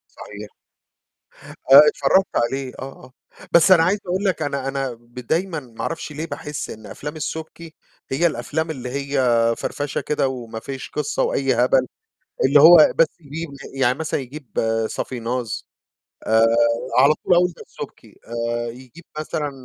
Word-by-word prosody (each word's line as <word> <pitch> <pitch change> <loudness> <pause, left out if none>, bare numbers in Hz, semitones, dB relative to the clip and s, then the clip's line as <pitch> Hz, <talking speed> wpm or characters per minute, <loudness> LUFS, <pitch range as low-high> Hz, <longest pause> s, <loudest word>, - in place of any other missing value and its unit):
صحيح. 105 0 -10 1.2
آه - - +12
اتفرّجت 165 +8 +3
عليه، 130 +2 -1
آه، - - -7 0.2
آه. 125 - -16 0.4
بس 170 +2 +6
أنا 165 -3 +7
عايز 195 +4 +2
أقول 185 +3 -1
لك 185 -4 0
أنا 140 -2 -2
أنا 135 -2 -2
ب 120 +1 -25
دايمًا 160 +7 -2
ما 115 -4 -14
أعرفش 155 +3 -4
ليه 155 +3 -5
باحس 150 -1 -6
إن 110 -1 -10
أفلام 150 +9 -7
السُبكي 160 +2 -6 0.4
هي 155 +6 +2
الأفلام 160 0 -2
اللي 125 -4 -5
هي 140 +1 -3 0.4
فَرفشة 145 -1 -3
كده 145 -3 0
وما 115 -3 -6
فيش 135 +2 -7
قِصّة 450 +3 -2
وأي - - +1
هبل، - - +3 0.6
اللي 140 +1 +5
هو 160 0 +8
بس 165 - +6
يجيب 160 +2 -6
ل - - -10 0.2
يعني 130 +2 +2
مثلًا 160 -2 -2
يجيب 135 0 -6 0.3
صافيناز 120 -2 -4 0.6
آآ 110 +1 +4 0.5
على 140 +4 +6
طول 180 - +4
أقول 180 0 +3
ده - - -11
السُبكي، - - -11 0.4
آآ 120 0 -3
يجيب 130 +7 -14
مثلًا 150 -1 -3
145 Hz, 155 wpm, -21 LUFS, 125-165 Hz, 1.2 s, آه